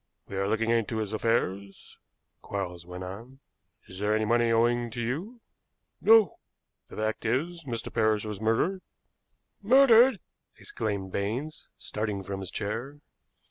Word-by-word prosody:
"We - - -7
are 100 0 0
looking 115 +2 +1
into 115 -1 0
his 110 -1 -3
affairs," 100 -3 -2 0.4
Quarles 90 -3 -5
went 90 +1 -7
on. 115 +9 -9 0.5
"Is 95 - -10
there 105 +1 +1
any 110 0 +1
money 120 +1 +2
owing 120 +1 +2
to 120 - -7
you?" 165 - -4 0.6
"No." 220 -6 +5 0.5
"The - - -12
fact 110 0 -2
is, 155 +8 -1
Mr. 115 -4 -5
Parrish 110 -2 +2
was 105 -1 -5
murdered." 120 - +1 0.8
"Murdered!" 245 0 +6 0.4
exclaimed 100 -3 -4
Baines, 120 +12 -3
starting 105 -2 -4
from 95 +1 -5
his 95 -2 -5
chair. 115 +9 -4
115 Hz, 140 wpm, -28 LUFS, 100-130 Hz, 0.8 s, Murdered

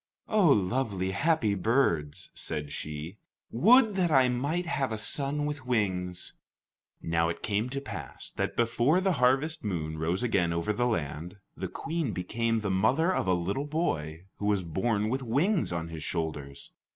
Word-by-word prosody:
"Oh, 210 -5 +4
lovely, 100 - +1
happy 125 - +2
birds," 90 - 0
said 75 -2 -4
she; 75 +8 -5 0.3
"would 220 - +5
that 180 -2 +2
I 130 -4 +5
might 145 +8 -1
have 140 -6 -1
a 110 - -2
son 140 +6 +1
with 150 -2 -4
wings!" 90 -6 -1 0.7
Now 85 0 +1
it 85 - -5
came 105 +4 0
to 135 +2 -3
pass 95 - -7
that - - -2
before 120 +8 +3
the 190 0 +2
harvest 135 +6 +2
moon 80 -6 -3
rose 85 +7 -1
again 90 -8 +1
over 85 +6 0
the 120 +4 +1
land, 85 - -3 0.2
the - - -4
Queen 160 -8 -3
became 115 +5 -1
the 100 -2 -1
mother 130 - +2
of 100 - -1
a 90 - +3
little 100 +12 -2
boy 85 - -2
who 105 - -2
was 100 -3 +2
born 100 +6 0
with 130 +3 -1
wings 150 - +1
on 85 -1 -3
his 80 -1 -7
shoulders. 75 -5 -4
105 Hz, 165 wpm, -29 LUFS, 85-140 Hz, 0.7 s, would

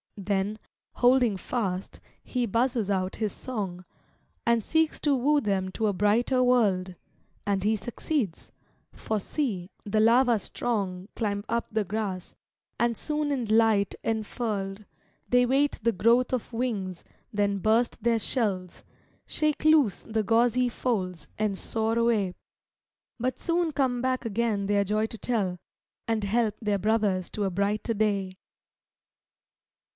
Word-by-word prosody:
Then, 200 +1 -1 0.4
holding 245 -3 +4
fast, 190 -4 -3 0.2
he 250 -1 -1
buzzes 230 -1 +1
out 185 -1 -1
his 215 -2 -1
song, 195 -8 -5 0.6
And 235 -2 +3
seeks 320 +4 +1
to 290 -2 +3
woo 290 +4 +3
them 195 -3 0
to 220 - 0
a 205 - +1
brighter 230 +6 +2
world. 200 -7 +2 0.5
And 195 -2 0
he 215 +2 +3
succeeds; 235 - -3 0.4
for 215 -1 -2
see, 195 - -2
the 215 +1 0
larva 235 +1 +5
strong 195 -3 -3
Climb 205 -2 -1
up 235 +1 0
the 220 0 +1
grass, 195 -2 -4 0.4
and 235 -1 +1
soon 300 -1 -1
in 260 -4 -1
light 220 -2 +3
enfurled, 215 -2 -2 0.4
They 245 0 +5
wait 275 +3 +2
the 230 +1 +3
growth 235 +6 +3
of 250 -2 -2
wings, 205 -7 -2 0.3
then 205 -1 +1
burst 220 +5 +1
their 230 -1 +2
shells, 200 -7 -2 0.4
Shake 305 0 0
loose 300 - +4
the 220 -1 -1
gauzy 240 +3 +3
folds, 185 -10 -2
and 210 -2 0
soar 225 +2 -1
away; 225 -6 +2 0.9
But 255 +2 -1
soon 340 -1 0
come 260 -4 0
back 255 0 -1
again 220 -2 0
their 205 0 +3
joy 215 +2 0
to 225 - -8
tell, 200 -7 -1 0.5
And 225 -2 0
help 215 +1 +1
their 210 -3 0
brothers 205 -3 +1
to 210 - -2
a 195 - 0
brighter 205 +5 0
day. 200 -3 0
220 Hz, 140 wpm, -27 LUFS, 200-245 Hz, 0.9 s, larva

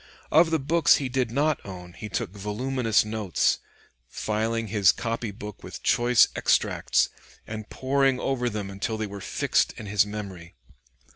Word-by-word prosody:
Of 160 +2 +6
the 160 - +2
books 155 +3 +4
he 135 -3 -2
did 130 -2 0
not 145 +5 0
own 90 -2 -9
he 105 - -8
took 95 - -3
voluminous 110 +3 0
notes, 105 -4 0 0.5
filling 110 - -2
his 100 -2 +5
copy 115 -1 -3
book 105 0 -9
with - - -9
choice 120 0 +5
extracts, - - +2 0.4
and 110 -1 -7
poring 135 0 +1
over 125 -3 0
them 105 -3 -5
until 100 +3 -3
they 110 - -2
were 100 -1 -8
fixed - - +1
in 110 - -9
his 105 0 +3
memory. 100 - -8
110 Hz, 155 wpm, -26 LUFS, 105-130 Hz, 0.5 s, Of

